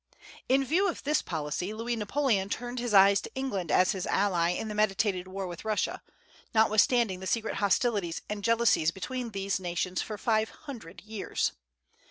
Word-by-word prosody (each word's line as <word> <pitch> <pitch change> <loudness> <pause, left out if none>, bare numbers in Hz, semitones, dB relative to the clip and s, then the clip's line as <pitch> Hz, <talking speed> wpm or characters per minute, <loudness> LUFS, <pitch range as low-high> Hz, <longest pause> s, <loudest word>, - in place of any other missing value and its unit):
In 270 +1 +4
view 370 +8 +2
of - - -6
this 300 +2 +2
policy, 165 +5 -3
Louis 235 +2 -2
Napoleon 215 -2 0
turned 245 +3 -4
his 240 -1 -2
eyes 200 0 +6
to - - -9
England 205 - -2
as 185 - +4
his 190 -3 -3
ally 180 -4 +2
in 180 +5 -2
the 210 - -4
meditated 205 -3 +1
war 190 +1 -5
with 175 -1 -7
Russia, 215 -1 -1 0.5
notwithstanding 220 -2 +3
the 190 - -6
secret 225 +1 -1
hostilities 200 -4 +1
and 210 -1 -5
jealousies 230 -8 +3
between 240 +8 -4
these 195 -2 -2
nations 180 0 -2
for 215 - -5
five 220 0 +1
hundred 235 - -10
years. 215 -1 -2
210 Hz, 170 wpm, -29 LUFS, 185-235 Hz, 0.5 s, eyes